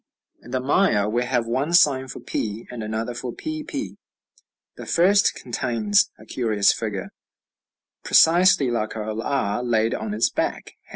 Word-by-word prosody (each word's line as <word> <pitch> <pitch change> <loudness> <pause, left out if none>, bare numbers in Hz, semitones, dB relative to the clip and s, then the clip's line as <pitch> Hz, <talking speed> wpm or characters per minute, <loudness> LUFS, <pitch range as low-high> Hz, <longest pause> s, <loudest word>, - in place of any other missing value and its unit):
In - - -14
the 130 +1 -1
Maya 130 - +2
we 120 +3 0
have 120 -2 0
one 130 +8 -2
sign 135 -6 +4
for - - -8
p, 110 +1 -4
and 120 -2 -6
another 110 +2 -3
for 120 +1 -5
pp. 310 - -6 0.8
The - - -10
first 195 +4 +3
contains 115 -4 0
a 110 - -16
curious 110 -4 +1
figure, 105 -4 -5 0.9
precisely 165 -6 +4
like 110 -2 -2
our 110 0 -4
r 120 -4 -1
laid 115 -2 +1
on 105 -1 -4
its 110 - +1
back - - -3
### - - -51
120 Hz, 155 wpm, -23 LUFS, 110-140 Hz, 0.9 s, sign